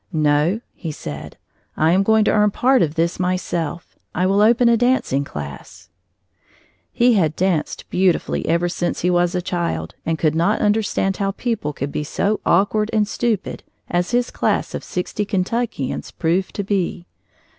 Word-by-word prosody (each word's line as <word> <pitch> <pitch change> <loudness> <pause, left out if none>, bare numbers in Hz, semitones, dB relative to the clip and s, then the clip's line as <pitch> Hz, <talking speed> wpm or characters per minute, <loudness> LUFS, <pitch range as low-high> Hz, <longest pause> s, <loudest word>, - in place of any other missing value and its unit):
"No," 155 +5 +2
he 165 - -6
said, 75 - -8 0.4
"I 160 +1 +3
am 185 +2 +4
going 220 +1 +3
to - - +3
earn 210 -1 +4
part 255 +5 +3
of 155 -1 0
this 170 +2 0
myself. 175 -3 -3 0.2
I 180 - +1
will 195 +2 +3
open 235 +3 +5
a 235 - +5
dancing 245 - +1
class." 85 - -9 1.0
He 240 0 +4
had 160 -7 +2
danced 180 -4 -1
beautifully 185 -1 +1
ever 170 +2 +2
since 175 0 -2
he 180 - +2
was 175 0 +2
a 180 - -1
child 175 -2 -2
and 165 0 -1
could 155 -1 +1
not 170 +7 +1
understand 205 -2 +1
how 195 -1 0
people 225 -10 -2
could 140 0 -5
be 150 - -2
so 200 +7 -1
awkward 210 +4 +2
and 215 -2 +2
stupid 220 -2 -2 0.3
as 175 0 0
his 245 0 0
class - - 0
of - - -4
sixty 180 +3 -3
Kentuckians 200 - -2
proved 175 +4 -1
to 200 - -2
be. 190 -3 -2
180 Hz, 165 wpm, -20 LUFS, 160-210 Hz, 1.0 s, open